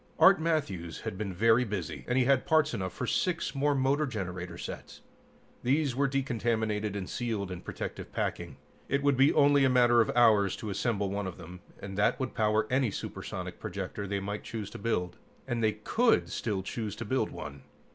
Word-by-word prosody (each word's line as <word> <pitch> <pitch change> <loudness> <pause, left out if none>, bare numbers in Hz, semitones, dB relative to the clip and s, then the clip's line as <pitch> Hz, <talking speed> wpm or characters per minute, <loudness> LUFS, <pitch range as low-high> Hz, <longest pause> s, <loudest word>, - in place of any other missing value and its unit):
Art 190 -3 +7
Matthews 100 - -1
had - - -4
been 100 0 -3
very 115 +6 +4
busy, 85 - -4
and 125 - +1
he 130 - +5
had 135 +2 +3
parts 155 -3 +3
enough 95 -1 -2
for 125 - -4
six 170 +7 0
more 145 +1 +1
motor 140 +3 +2
generator 90 -6 -5
sets. - - -8 0.6
These 140 0 +1
were 140 +1 +2
decontaminated 115 -6 -1
and 95 -2 -4
sealed 110 -6 -3
in 90 - -6
protective - - -6
packing. - - -3 0.3
It 140 +1 +1
would 140 -1 +4
be 135 +3 +5
only 145 -1 +5
a 135 - +5
matter 120 -2 +5
of 110 - +1
hours 105 -5 +5
to 105 - -5
assemble 100 -2 -1
one 100 -1 -2
of 95 - -7
them, 90 +2 -10 0.2
and 95 0 -6
that 105 - +2
would 130 -2 -3
power 110 0 +2
any 130 -2 +2
supersonic - - -6
projector 100 +2 -5
they 100 +1 -1
might 100 +2 -4
choose 110 -3 -6
to - - -8
build. 95 -5 -1 0.3
And 115 -1 -1
they 110 -1 +3
could 225 - +2
still 100 -4 -2
choose 105 +1 -4
to - - -6
build - - 0
one. 70 0 -8
110 Hz, 195 wpm, -30 LUFS, 100-135 Hz, 0.6 s, Art